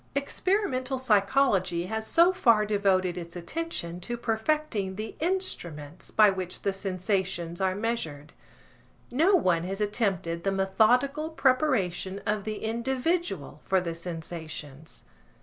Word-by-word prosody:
Experimental 280 -3 0
psychology 200 -6 +2
has 220 +3 -3
so 345 +2 +5
far 230 - +4
devoted 190 -4 +1
its 170 0 -9
attention 175 - -4
to 240 +7 -4
perfecting 225 -3 -1
the 215 +2 -6
instruments 175 - -3
by 215 -1 +6
which 185 -2 -5
the 200 - +1
sensations 185 -2 -2
are 190 -1 +1
measured. 165 -10 -3 0.8
No 330 +10 +4
one 180 - +2
has 195 +2 -3
attempted 195 -6 -1
the 195 - +1
methodical 245 +10 +2
preparation 255 - +1
of 210 -2 -1
the 215 -1 -4
individual 235 - -1
for 190 - +2
the 170 -2 -3
sensations. 160 -3 -7
200 Hz, 120 wpm, -28 LUFS, 180-255 Hz, 0.8 s, by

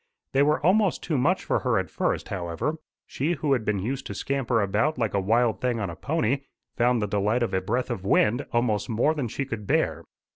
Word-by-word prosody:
They 135 - +4
were 150 +2 +3
almost 195 +1 +3
too 160 - -1
much 155 +8 +2
for - - +1
her - - +1
at - - -2
first, - - -1
however. 90 - -3 0.3
She 155 +6 -1
who 150 -3 0
had 125 -4 0
been 105 -1 0
used 125 +8 -3
to - - -6
scamper 135 -4 0
about 110 +10 +1
like 115 -4 -1
a 100 - +2
wild 115 +4 +2
thing 125 -2 0
on 100 -5 -2
a - - -8
pony, 140 - 0 0.4
found 120 -2 +2
the - - 0
delight 105 +4 +1
of 115 - -2
a 95 - +1
breath 120 +7 -1
of 95 - -4
wind 105 +5 +3
almost 120 -2 0
more 120 +7 +2
than 145 -6 -2
she 140 +5 -3
could 115 -6 -6
bear. - - +1
120 Hz, 225 wpm, -26 LUFS, 105-140 Hz, 0.4 s, They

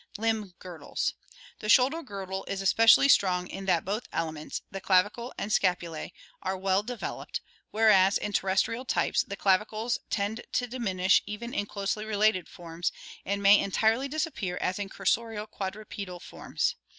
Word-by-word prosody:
Limb 220 -3 -1
Girdles.— 175 -3 -4 0.5
The 215 - -5
shoulder 270 +8 +5
girdle 195 - -6
especially 200 +6 +5
is 280 - +8
strong 180 -2 +1
in 195 +1 -7
that 170 -3 +2
both 205 +5 -3
elements, 160 -2 -4
the 195 - -6
clavicles 205 +7 +1
and 210 - -2
scapula;, 175 -5 0 0.3
are 190 0 -2
well 190 +1 +1
developed, 240 +2 -5 0.3
whereas 205 -3 +5
in 205 - -4
terrestrial 195 +6 +1
types 260 - +1
the 200 - -6
clavicles 215 +4 +1
tend 215 +3 -1
to 250 - +1
diminish, 200 -7 +2
even 220 +4 -6
in 205 - -1
closely 200 +1 -3
related 215 -4 +1
forms, 170 0 -4 0.4
and 200 0 -1
may 200 +1 +8
entirely 220 +6 +1
disappear 285 - -3
as 185 +3 -1
in 200 -1 -4
cursorial 215 +3 -1
quadrupedal 195 -2 -6
forms. - - -2
200 Hz, 150 wpm, -28 LUFS, 190-225 Hz, 0.5 s, is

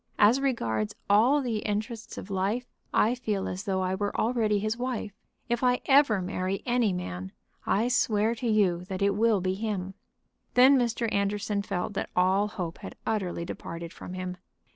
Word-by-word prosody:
As 225 +6 +5
regards 110 - -1 0.2
all 250 +8 +5
the 235 -3 -1
interests 215 +2 -4
of 200 - -7
life, 200 +6 0 0.3
I 225 - +3
feel 215 -6 -2
as 185 +4 -5
though 190 -2 0
I 185 0 0
were 205 +1 -2
already 220 -3 +2
his 215 +2 -1
wife. 245 -4 -3 0.3
If 240 +1 -1
I 250 0 +3
ever 265 -9 +4
marry 185 +1 -2
any 240 -4 +2
man 95 - -5 0.4
I 220 +4 +2
swear 220 -3 +2
to 235 +1 -4
you 195 -6 +2
that 190 +1 -3
it 200 - +4
will 215 -1 +3
be 185 +1 0
him." 195 -2 -3 0.6
Then 260 +3 +7
Mr. 240 -2 +1
Anderson 200 0 0
felt 200 -1 -3
that - - -3
all 190 +3 +3
hope 180 -5 -5
had - - -8
utterly 185 -6 -1
departed 170 0 -7
from 180 - -8
him. 185 -1 -4
205 Hz, 175 wpm, -28 LUFS, 185-230 Hz, 0.6 s, Then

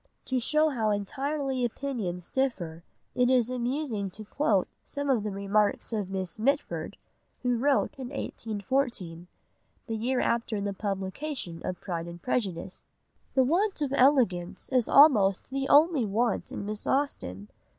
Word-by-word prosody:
To 260 -1 0
show 305 +5 +2
how 225 -6 0
entirely 265 +6 -1
opinions 220 -8 -3
differ 175 -12 -1 0.3
it 250 0 +3
is 250 -2 +3
amusing 245 -4 -2
to 215 +4 -9
quote 210 -5 +1 0.2
some 285 -1 -2
of 240 -5 +2
the 210 - -3
remarks 200 +3 0
of 205 -4 -2
Miss 190 -1 -2
Mitford, 280 +6 -1 0.5
who 245 -2 +1
wrote 275 +2 +2
in 260 - -4
1814, 220 -8 -3 0.6
the 225 - -3
year 250 +4 0
after 230 -2 0
the 200 0 -2
publication 195 - -4
of 180 -1 -4
Pride 170 -3 -4
and 170 0 -8
Prejudice: 190 -6 -2 0.5
"The 265 - +5
want 370 +9 +1
of 275 -1 -2
elegance 245 -11 +2
is 255 -4 +2
almost 220 -9 +5
the 270 0 -2
only 290 -5 +5
want 225 +4 0
in - - -5
Miss 210 0 -4
Austen. 105 - -1
230 Hz, 145 wpm, -28 LUFS, 195-270 Hz, 0.6 s, The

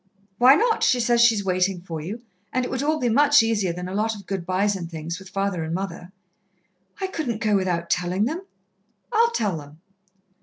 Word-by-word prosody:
"Why 255 +3 +8
not? 450 +5 +1
She 250 - +3
says 235 0 +3
she's 225 -4 +4
waiting 185 0 +1
for 165 -3 -6
you, 210 +9 -6 0.3
and 255 0 0
it - - -5
would 260 - -2
all 305 +2 +1
be 245 - 0
much 285 +3 +5
easier 210 -5 0
than 180 +1 -6
a 185 - -6
lot 220 +2 0
of 200 -2 -11
good 190 -3 -4
byes 195 +2 +1
and 175 -3 -6
things, 165 +2 -5
with 190 -1 -12
father 195 -3 -2
and 160 +1 -3
mother." 190 -1 -5 0.9
"I 385 - -1
couldn't 305 - -3
go 215 -2 +1
without 175 -3 -1
telling 180 +3 +1
them." 320 +9 -3 0.7
"I'll 460 +1 +4
tell 210 - -1
them." 145 +1 -14
200 Hz, 205 wpm, -23 LUFS, 180-245 Hz, 0.9 s, Why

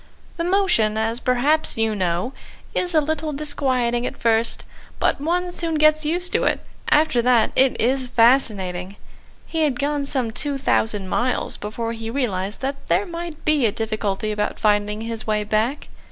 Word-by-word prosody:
The 335 - -1
motion, 355 - +2
as 225 +2 0
perhaps 255 +5 +2
you 225 -1 +1
know, 185 +6 -1 0.4
is 355 -2 -1
a 310 - +5
little 310 0 -2
disquieting 260 -5 0
at - - -7
first, 230 0 +2 0.4
but - - +1
one 355 +3 0
soon 335 -2 -3
gets 305 0 +4
used 355 +4 -1
to - - +2
it. - - +1 0.3
After 300 -5 +3
that 235 -2 +3
it 265 0 +3
is 255 +2 +1
fascinating. 205 -7 +2 0.5
He 325 - -4
had 290 -5 +1
gone 285 0 -1
some 260 -5 -1
two 285 +4 -3
thousand 215 -6 0
miles 245 +6 -1
before 230 +2 -4
he 225 -1 -6
realised 210 -6 -2
that 275 +1 -2
there 405 - +2
might 340 -3 -7
be 300 -6 +3
a - - 0
difficulty 215 -1 -2
about 210 0 -2
finding 210 0 +1
his 225 -1 -5
way 210 -1 +1
back. 220 +7 -1
245 Hz, 170 wpm, -22 LUFS, 220-300 Hz, 0.5 s, a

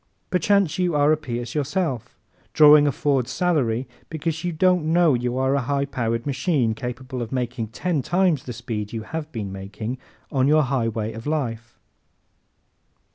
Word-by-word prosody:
Perchance 195 -3 +2
you 175 -3 +1
are 145 +1 +4
a - - +5
Pierce 120 -5 -5
yourself, 145 - -2 0.4
drawing 150 -1 +7
a - - +3
Ford 135 -3 0
salary 135 -7 0 0.2
because 160 +1 -3
you 175 - -1
don't 180 +1 +2
know 165 -1 +4
you 125 0 -1
are 130 +1 +2
a 140 - +1
high 140 +3 0
powered 115 -4 -2
machine 140 -4 +1
capable 125 +2 -5
of 115 - -5
making 120 -3 -2
ten 155 +7 -1
times 175 -1 +2
the 125 - -5
speed 110 -3 -5
you 110 -1 -4
have 155 +6 -6
been 105 -5 -5
making 105 +6 -6 0.3
on 135 -2 +2
your 155 +1 +5
highway 115 -4 -1
of 115 +4 -8
life. 120 -6 -3
135 Hz, 165 wpm, -23 LUFS, 120-155 Hz, 0.4 s, drawing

